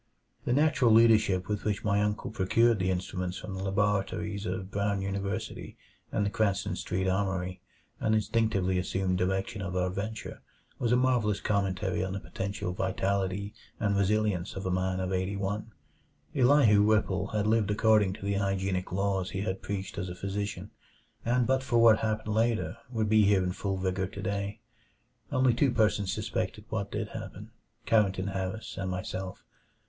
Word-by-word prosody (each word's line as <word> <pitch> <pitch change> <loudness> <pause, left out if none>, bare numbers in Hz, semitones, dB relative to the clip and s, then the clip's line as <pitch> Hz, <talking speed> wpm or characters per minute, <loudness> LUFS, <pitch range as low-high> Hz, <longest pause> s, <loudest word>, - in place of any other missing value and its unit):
The 120 - +1
natural 150 -3 +3
leadership 110 -5 +5
with 105 -1 -2
which 105 -2 -1
my 100 -1 +2
uncle 105 0 -1
procured 110 +2 +3
the 95 0 +1
instruments 90 0 -2
from 100 - -7
the 95 - -5
laboratories 100 +1 -1
of 95 +1 -4
Brown 100 -1 0
University 100 0 -4 0.3
and 105 - +1
the 100 - -1
Cranston 100 -4 0
Street 95 +1 -2
Armory, 95 -1 -1 0.4
and 110 - +2
instinctively 105 -4 +1
assumed 90 0 -1
direction 95 +3 -1
of 95 -2 -4
our 90 0 +1
venture, 110 +4 -5 0.4
was 120 - 0
a - - +5
marvelous 125 -5 +2
commentary 100 -1 0
on 95 0 -3
the 100 - -3
potential 100 -1 -4
vitality 95 +1 -1 0.3
and 105 -3 +1
resilience 100 -2 +1
of 95 - -5
a 95 - 0
man 95 0 0
of 95 0 -2
eighty 95 +2 -1
one. 100 +3 -3 0.6
Elihu 125 -6 +5
Whipple 105 -2 +2
had 105 -2 -1
lived 110 -1 +2
according 105 -2 +3
to 100 - -8
the 100 - 0
hygienic 95 -2 -1
laws 95 0 0
he 95 - -3
had 95 -2 -3
preached 100 0 -4
as 90 -1 -3
a 90 - -6
physician, 100 +2 -4 0.5
and 120 +1 +2
but 130 +1 +2
for 120 -2 0
what 115 -2 +7
happened 110 -1 -1
later 115 +1 +1
would 110 -3 -1
be 110 0 +5
here 100 -2 +4
in 90 - -1
full 95 +1 -2
vigor 95 0 -1
today. 100 +1 -4 0.7
Only 130 -1 +3
two 135 +4 +3
persons 105 -4 +2
suspected - - -3
what - - -2
did - - -3
happen - - -8 0.3
Carrington 100 -3 +2
Harris 95 +3 -4
and 95 -1 -2
myself. 95 0 -5
100 Hz, 165 wpm, -29 LUFS, 95-110 Hz, 0.7 s, what